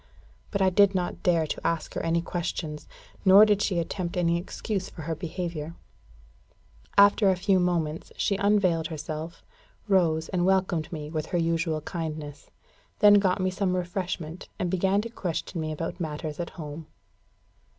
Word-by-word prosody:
But 200 -2 0
I 190 - +4
did 200 +1 +4
not 180 -1 -2
dare 170 -3 +2
to - - -4
ask 165 -2 -1
her - - -2
any 165 0 0
questions, 160 -3 -4 0.4
nor 195 +2 +8
did 210 -1 +2
she 190 -4 0
attempt 170 +1 -3
any 170 -1 +2
excuse 195 +1 -4
for 160 - -9
her 165 +2 -2
behaviour. 170 -1 -5 1.2
After 200 0 +6
a 190 - +3
few 190 +1 +2
moments, 165 -3 -1
she 200 - +1
unveiled 195 -6 +2
herself, 155 +1 -6 0.4
rose, 165 -5 +2
and 180 -2 0
welcomed 185 -4 +1
me 150 -2 -6
with 155 -2 -3
her 175 - -1
usual 165 -2 0
kindness; 155 -3 -6 0.5
then 205 0 +7
got 190 -1 +1
me 185 0 +1
some 185 -1 0
refreshment, 180 -2 -4
and 175 - -2
began 190 +2 +2
to 230 - -6
question 175 -4 -3
me 155 0 -3
about 160 +2 -4
matters 155 -1 -4
at 170 - -3
home. 155 0 -7
175 Hz, 160 wpm, -27 LUFS, 160-190 Hz, 1.2 s, nor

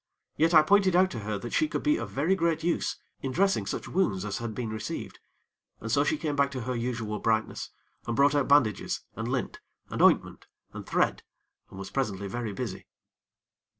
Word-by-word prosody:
Yet 165 +2 +3
I 155 - +9
pointed 195 +1 +4
out 185 +1 +4
to 120 - -5
her 105 0 -3
that 120 +4 -7
she 310 - +3
could - - -3
be 300 0 +3
of - - -5
very 155 +7 +1
great 165 -3 0
use 170 0 0 0.2
in 135 - -3
dressing 195 +6 +1
such - - -4
wounds 105 - 0
as 100 -1 -3
had 115 -2 -5
been 115 -2 -3
received, 110 0 -5 0.6
and 115 - -5
so 140 +4 +4
she 150 - 0
came 150 -2 -2
back 140 0 +3
to 130 - -4
her 125 +2 -3
usual 115 -3 -3
brightness, 110 -1 -1 0.4
and 120 - -1
brought 140 +2 +4
out 145 -2 +1
bandages, 140 -8 +2
and 110 +1 -4
lint, 125 0 -2 0.3
and - - -2
ointment, - - +3 0.3
and - - -8
thread, - - +1 0.5
and - - -12
was 95 0 -7
presently 100 -7 -2
very 115 +2 -4
busy. 100 - -5
130 Hz, 200 wpm, -28 LUFS, 110-160 Hz, 0.6 s, I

